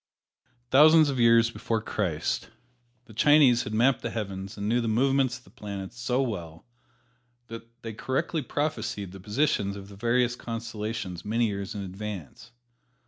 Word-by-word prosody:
Thousands 155 +2 +7
of 130 - -3
years 115 0 +5
before 115 -1 -2
Christ, 95 -8 -2 0.6
the 110 - -15
Chinese 135 -1 +5
had 105 - -5
mapped 125 +3 +3
the 115 - -3
heavens 100 -3 -5
and 100 0 -3
knew 120 +3 +2
the 115 - -2
movements 130 +2 +2
of 125 - -20
the - - -20
planets 100 +1 -7
so 125 +2 +1
well 85 -9 -5 0.8
that 115 +1 -11
they 115 -1 -5
correctly 140 +8 -1
prophesied 145 - -3
the 95 - -10
positions 105 -1 0
of 100 0 -9
the 100 - -11
various 120 +3 +1
constellations 110 -6 -5
many 115 +3 +1
years 100 -1 -4
in 100 - -4
advance. 100 - -7
115 Hz, 155 wpm, -27 LUFS, 100-125 Hz, 0.8 s, Thousands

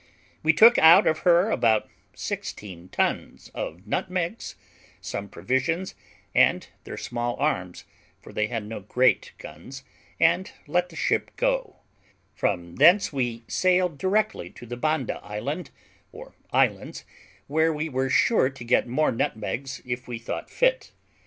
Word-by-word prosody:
We 160 - +4
took 230 +8 +7
out 170 +5 +8
of 155 0 +2
her 175 +5 +4
about 110 - +2 0.3
sixteen 90 -3 -6
ton - - -1 0.2
of 90 +4 -6
nutmegs, 180 - -3 0.4
some 100 0 -6
provisions, 130 - -1 0.4
and - - +3 0.2
their - - -7
small 120 0 -3
arms, 130 -12 -2 0.4
for - - -14
they 105 0 0
had 115 -2 -4
no 110 +1 -6
great 125 +6 +1
guns, 130 - -11 0.4
and 170 +3 +3 0.2
let 175 +4 0
the 165 - -14
ship - - 0
go: - - -1 0.5
from 85 -1 -2
thence 170 +6 +5
we 120 -4 -2
sailed 180 -4 +1
directly 195 - 0
to 110 - -13
the 120 +1 -6
Banda 155 0 -1
Island, 130 - -5 0.4
or - - -12 0.2
Islands, - - 0 0.4
where 160 +3 +2
we 155 +1 -3
were 135 -2 -1
sure 130 - +3
to 135 -3 -11
get 120 +1 +2
more 140 +6 +1
nutmegs 125 +4 -3
if 125 0 -5
we 120 -2 -5
thought 115 - -6
fit. - - 0
135 Hz, 140 wpm, -25 LUFS, 115-175 Hz, 0.5 s, out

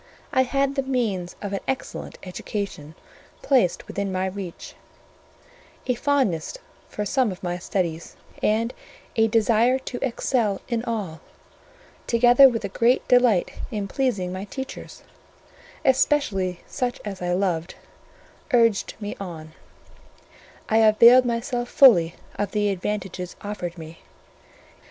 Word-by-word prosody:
I 260 - +4
had 275 +2 0
the 275 - 0
means 225 -10 -2
of 200 -1 -4
an 195 - -1
excellent 265 - -4
education 185 -4 -6 0.5
placed 245 -11 +2
within 200 -1 -3
my 185 0 -1
reach; 190 -2 -7 1.1
a 250 - +1
fondness 255 - 0 0.3
for 210 - -4
some 250 +1 +1
of 185 - -10
my 175 0 -2
studies, 170 -2 -3 0.3
and 225 +3 +1 0.4
a 225 -1 +4
desire 230 +3 +3
to 260 -2 -6
excel 230 -5 0
in 235 -2 -2
all, 205 -9 -4 0.9
together 245 +3 +7
with 230 -3 -3
a - - -1
great 235 +6 +1
delight 245 -7 +4 0.2
in 210 -5 -3
pleasing 200 -7 -1
my 190 +2 -5
teachers, 265 +5 -8 0.8
especially 215 -10 +1
such 250 -3 -3
as 195 -3 -6
I 175 0 -1
loved, 180 -3 -1 0.8
urged 230 -4 +3
me 205 -1 -5
on: 165 -5 -8 1.2
I 220 - +2
availed 230 +3 +7
myself 240 +1 -2
fully 175 -12 +6 0.2
of 205 -1 -2
the 210 -1 +1
advantages 190 -2 -4
offered 185 -4 -5
me. 160 0 -10
210 Hz, 125 wpm, -24 LUFS, 185-245 Hz, 1.2 s, together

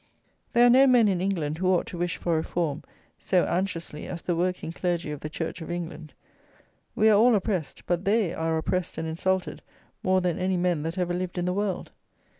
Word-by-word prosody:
There 240 0 +6
are - - +7
no 265 +2 +7
men 245 -4 +5
in 185 -3 +1
England 165 -5 -1
who 185 - 0
ought 185 -2 +3
to 175 - -7
wish 175 -1 -1
for 170 -2 0
reform 160 -1 -1 0.4
so 180 -2 +2
anxiously 170 -4 -3
as 170 - -6
the 175 - 0
working 180 -1 -1
clergy 170 -2 -2
of 150 - -5
the 155 - -6
church 165 +2 -5
of 160 - -7
England; 170 -3 -6 0.8
we 215 - +4
are 210 -2 +6
all 240 +1 +6
oppressed; 190 -6 -2
but 175 +1 0
they 200 -3 +2
are 160 -1 -1
oppressed 180 +2 -2
and 160 - -3
insulted 185 +3 -1 0.4
more 185 0 +3
than 180 -2 -1
any 185 0 0
men 175 -3 +1
that 165 +4 -4
ever 175 -1 0
lived 180 0 -3
in 175 - 0
the 180 - 0
world. 200 -2 -2
180 Hz, 210 wpm, -26 LUFS, 165-190 Hz, 0.8 s, are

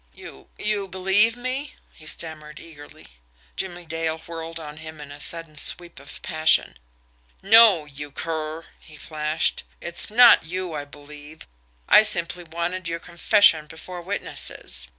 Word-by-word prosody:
"You 65 - -14
you 210 -2 -2
believe 190 +5 +3
me?" 255 +3 -5 0.2
he 155 - -16
stammered 155 -2 -4
eagerly. 145 -3 -14 0.5
Jimmie 175 -2 -6
Dale 160 0 -3
whirled 165 0 -8
on 150 -1 -10
him 155 -1 -10
in 145 -1 -11
a 145 +1 -11
sudden 165 -2 -4
sweep 175 +2 0
of - - -12
passion. 155 - +2 0.6
"NO, 205 -5 +6
you 145 0 -9
cur!" 160 +2 -6
he 155 -2 -16
flashed. 155 +1 -1 0.2
"It's 170 0 0
not 240 +2 +7
you 180 +1 -6
I 145 -1 -5
believe. 145 +1 -13 0.4
I - - +7
simply 175 -4 +2
wanted 170 +2 -5
your 165 0 -3
confession 170 -2 +3
before 175 +3 -10
witnesses." 175 - 0
165 Hz, 140 wpm, -22 LUFS, 155-185 Hz, 0.6 s, not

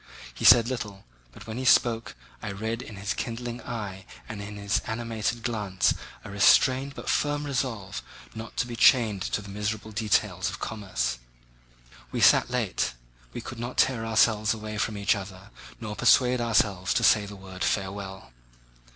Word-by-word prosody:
He - - -5
said 120 -2 +8
little, 105 -6 -5 0.3
but 105 - -13
when 110 +2 -5
he - - -3
spoke 115 -2 +3 0.3
I 105 - -4
read 110 +4 -3
in 110 - -9
his 100 +2 -3
kindling 120 +1 -5
eye 100 -5 -6 0.2
and 110 -3 -6
in 105 0 -7
his 100 0 0
animated 115 0 -2
glance 105 -5 +1 0.3
a - - -8
restrained 130 +6 +4
but - - -9
firm 145 0 +1
resolve 125 -8 -3 0.3
not 110 0 -9
to - - +1
be 120 -1 -6
chained 110 -4 +4
to 105 - -2
the 100 - -10
miserable 105 +2 -3
details 110 -1 0
of - - -6
commerce. 100 - -3 0.9
We - - -2
sat - - +5
late. - - -1 0.4
We - - -6
could 120 - -8
not 120 +2 -5
tear 125 -4 +2
ourselves 110 -1 +3
away 110 0 -6
from 110 0 -1
each 100 +1 +2
other 95 0 -9 0.3
nor 105 -2 -5
persuade 125 +1 +4
ourselves 105 -5 +1
to 120 - +2
say 105 -2 +5
the 100 - -9
word 95 -1 -7
"Farewell!" 95 -2 -3
110 Hz, 170 wpm, -27 LUFS, 100-120 Hz, 0.9 s, said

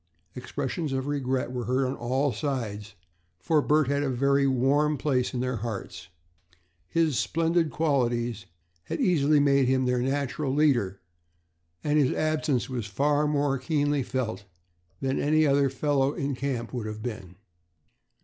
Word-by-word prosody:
Expressions 140 +4 -3
of 130 0 -2
regret 130 -3 -1
were 125 -2 -4
heard 130 +2 +1
on 130 +1 -2
all 130 +4 0
sides, 110 -8 -4 0.4
for 150 - +2
Bert 150 -1 +2
had 140 +1 +1
a 145 - 0
very 140 +2 +2
warm 140 +4 +2
place 130 -3 0
in 125 - -3
their 125 -1 -1
hearts. 110 -6 -6 0.8
His 155 - +1
splendid 165 +7 +1
qualities 120 -8 0 0.4
had - - -4
easily 155 - +3
made 140 -2 +3
him 130 0 +2
their 125 -1 +1
natural 140 +1 -1
leader 120 -11 +2 0.8
and 150 0 +2
his 135 -3 +2
absence 155 -4 0
was 120 -5 -4
far 145 +7 +1
more 145 -2 +1
keenly 145 +1 0
felt 125 -5 -3 0.6
than 135 0 0
that - - -1
of - - -1
any 155 +1 +4
other 140 -1 +3
fellow 135 +1 +1
in 140 -4 -3
the 125 - -8
camp 130 -4 -3
would 120 -4 -3
have 110 0 -6
been. 105 -7 -6
135 Hz, 160 wpm, -27 LUFS, 125-145 Hz, 0.8 s, any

